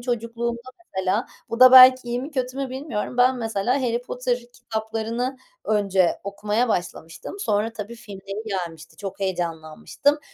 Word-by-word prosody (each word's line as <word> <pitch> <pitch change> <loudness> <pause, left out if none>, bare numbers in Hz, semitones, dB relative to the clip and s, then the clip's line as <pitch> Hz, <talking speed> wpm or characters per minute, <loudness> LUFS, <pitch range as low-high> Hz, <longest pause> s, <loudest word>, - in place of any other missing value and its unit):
çocukluğumda, 235 -1 -3 0.3
mesela, 190 +4 0 0.2
bu 230 +2 -4
da, 255 0 +9
belki, 255 -1 +9
iyi 240 +1 -1
mi, 290 - -6
kötü 255 -2 -3
mü 275 -2 -3
bilmiyorum. 255 -3 -4
Ben 250 +1 +4
mesela, 225 +3 0
“Harry 240 -1 0
Potter” 250 0 -2
kitaplarını 230 +2 -3 0.3
önce 195 -4 +1
okumaya 210 +4 -1
başlamıştım. 175 - -4
Sonra 215 - 0
tabii, 220 +1 -7
filmleri 200 -2 -8
gelmişti. 170 -5 -5
Çok 200 -1 -7
heyecanlanmıştım. 175 - -1
230 Hz, 140 wpm, -23 LUFS, 200-250 Hz, 0.3 s, da